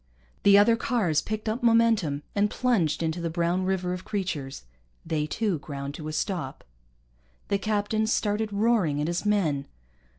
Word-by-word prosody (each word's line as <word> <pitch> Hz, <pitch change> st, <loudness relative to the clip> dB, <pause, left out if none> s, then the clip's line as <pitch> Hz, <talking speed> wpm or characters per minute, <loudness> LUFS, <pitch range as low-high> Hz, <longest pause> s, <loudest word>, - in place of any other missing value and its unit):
The 200 Hz, 0 st, +6 dB
other 210 Hz, +3 st, +6 dB
cars 220 Hz, -10 st, +1 dB
picked 215 Hz, 0 st, -5 dB
up 220 Hz, +3 st, -1 dB
momentum 225 Hz, -11 st, +3 dB
and 205 Hz, +1 st, +2 dB
plunged 180 Hz, -13 st, +1 dB
into 160 Hz, +2 st, -2 dB
the 170 Hz, -, -2 dB
brown 175 Hz, +2 st, 0 dB
river 185 Hz, -1 st, -1 dB
of 180 Hz, 0 st, -6 dB
creatures. 175 Hz, -, -4 dB, 0.4 s
They 155 Hz, -2 st, -1 dB
too 200 Hz, -1 st, -1 dB
ground 140 Hz, -1 st, -6 dB
to 155 Hz, 0 st, -7 dB
a -, -, -3 dB
stop. 155 Hz, -4 st, -3 dB, 0.9 s
The 200 Hz, -, +1 dB
captain 215 Hz, +1 st, 0 dB
started 215 Hz, -1 st, 0 dB
roaring 200 Hz, -8 st, +2 dB
at 150 Hz, -, 0 dB
his 175 Hz, +5 st, -2 dB
men. 155 Hz, -10 st, +1 dB
190 Hz, 160 wpm, -26 LUFS, 155-215 Hz, 0.9 s, The